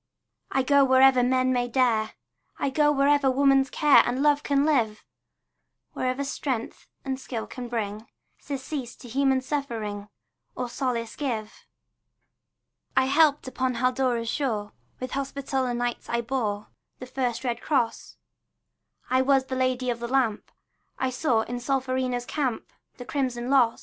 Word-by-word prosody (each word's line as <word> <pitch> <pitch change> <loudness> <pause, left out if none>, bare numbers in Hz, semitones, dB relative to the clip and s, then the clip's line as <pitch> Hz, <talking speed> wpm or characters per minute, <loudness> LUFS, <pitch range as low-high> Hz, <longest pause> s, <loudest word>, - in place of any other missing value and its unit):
I 265 - +1
go 280 +1 +5
wherever 260 -1 +6
men 255 +1 +2
may 245 -1 0
dare, 235 -3 +1 0.4
I 275 - -1
go 295 +1 +3
wherever 285 -1 +3
woman's 270 0 +3
care 295 -2 +6
And 255 +3 -1
love 290 -1 +4
can 280 -1 +1
live, 230 -9 +1 0.9
Wherever 255 +2 -1
strength 265 -4 -4 0.2
and 265 -1 -2
skill 235 -4 -5
can 250 -1 -7
bring 220 -2 -4 0.3
Surcease 265 -2 -5
to 245 - -13
human 265 +2 +2
suffering, 225 -8 -4 0.5
Or 250 -1 -3
solace 235 -3 -2
give. 225 -7 -4 1.3
I - - +5
helped 290 0 +3
upon 260 -1 -1
Haldora's 250 -1 0
shore; 220 -6 -2 0.3
With 255 0 -5
Hospitaller 270 -2 -2
Knights 240 0 -3
I 235 0 0
bore 225 -4 -2 0.3
The 255 - -8
first 250 -2 -2
red 240 -2 -2
cross; 240 -6 -1 0.9
I 255 0 +4
was 270 0 +3
the 260 - -4
Lady 255 -1 0
of 235 - -4
the 235 - -4
Lamp; 245 -4 0 0.5
I 260 -1 -1
saw 255 -3 +1
in 245 +2 -4
Solferino's 255 -1 -1
camp 260 -4 -3 0.2
The 245 - -8
crimson 255 -3 -2
loss. 245 -4 +4
255 Hz, 145 wpm, -26 LUFS, 240-270 Hz, 1.3 s, wherever